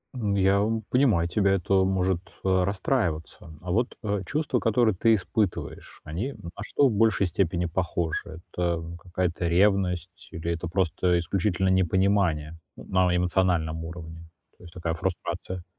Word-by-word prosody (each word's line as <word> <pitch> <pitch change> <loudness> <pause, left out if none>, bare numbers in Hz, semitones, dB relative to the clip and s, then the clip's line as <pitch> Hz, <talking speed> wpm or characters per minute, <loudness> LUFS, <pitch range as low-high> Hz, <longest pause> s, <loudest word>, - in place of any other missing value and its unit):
М, 105 -5 -1
я 100 +1 +3 0.3
понимаю, 115 -11 +3
тебя 100 +1 +2
это 95 0 0
может, 95 -2 +1 0.2
э, 95 -1 +3
расстраиваться, 90 - -2
а 90 0 -5
вот, 120 +5 0
э, 100 -2 -1
чувства, 145 - 0
которые 110 -2 +2
ты 115 +5 +4
испытываешь, 100 0 -3
они 100 - -4
на 85 - -10
что 140 +5 +3
в - - +1
большей 105 -2 +3
степени 90 0 0
похожи? 85 -2 -2
Это 85 -2 0 0.2
какая-то 90 -1 -1
ревность 90 -1 +1
или 85 +1 -3
это 85 +1 -3
просто 90 0 +1
исключительно 95 +2 0
непонимание 95 -4 +2 0.2
на 95 -1 +1
эмоциональном 85 -3 +1
уровне, 85 -1 -9 0.3
то - - -18
есть 85 -1 -13
такая 85 -2 -2
фрустрация? 85 +1 -4
90 Hz, 140 wpm, -26 LUFS, 85-100 Hz, 0.3 s, ты